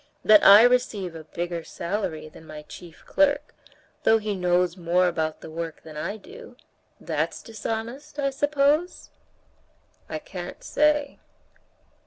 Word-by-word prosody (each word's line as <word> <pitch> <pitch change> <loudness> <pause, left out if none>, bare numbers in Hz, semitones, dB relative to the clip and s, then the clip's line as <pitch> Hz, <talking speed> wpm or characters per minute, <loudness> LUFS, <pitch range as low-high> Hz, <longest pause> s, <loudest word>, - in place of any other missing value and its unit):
That 215 -1 +7
I 205 +3 +10
receive 240 -7 +1
a 160 -1 -10
bigger 170 +1 -4
salary 170 -5 -4
than 160 +1 -15
my 150 0 -9
chief 170 +1 -13
clerk, 290 0 +1 0.5
though 225 - +5
he 215 -1 -3
knows 180 -1 +1
more 180 0 +2
about 160 -2 -2
the - - -9
work 165 0 -6
than 155 -1 -11
I 180 +8 -4
do—that's 455 - -7
dishonest, 230 +6 -6
I 275 -1 0
suppose?" 290 +4 +1 1.0
"I - - -3
can't - - -8
say." 295 - +1
205 Hz, 130 wpm, -25 LUFS, 170-280 Hz, 1.0 s, I